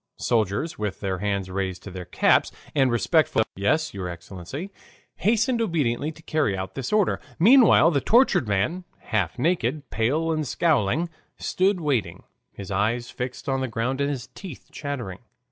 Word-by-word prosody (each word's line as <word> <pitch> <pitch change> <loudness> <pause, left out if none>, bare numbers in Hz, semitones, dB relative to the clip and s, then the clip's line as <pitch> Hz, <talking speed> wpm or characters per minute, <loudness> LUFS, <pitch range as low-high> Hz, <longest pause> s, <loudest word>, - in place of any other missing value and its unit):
Soldiers, 115 - 0
with 105 -2 -3
their 95 -2 -2
hands 100 -2 -2
raised 95 -1 -3
to 100 - -8
their 90 -1 -7
caps, - - +3 0.2
and 135 -3 +3
respectful 120 +2 +2
murmurs - - -1
of 95 - -10
"Yes, 155 +9 +1
your 95 -2 -4
Excellency," 95 - -7 0.5
hasten 230 +3 +2
obediently 150 - 0
to 160 - -17
carry 155 - 0
out 95 0 -5
this 135 -3 -4
order. 210 -3 +2 0.2
Meanwhile 220 - +6
the 140 -4 +1
tortured 205 - +4
man, 105 - 0
half 105 -8 -2
naked, 155 0 0
pale 150 +9 +1
and 155 -2 -1
scowling, 155 - +1 0.3
stood 190 +1 +1
waiting, 125 - -1 0.3
his 100 -1 -9
eyes 115 +5 0
fixed 125 +1 -6
on 135 -1 0
the 130 - -1
ground 125 +4 -2
and 140 - +1
his 130 -4 -4
teeth 185 -9 -10
chattering. 125 -11 -5
130 Hz, 165 wpm, -25 LUFS, 100-160 Hz, 0.5 s, Meanwhile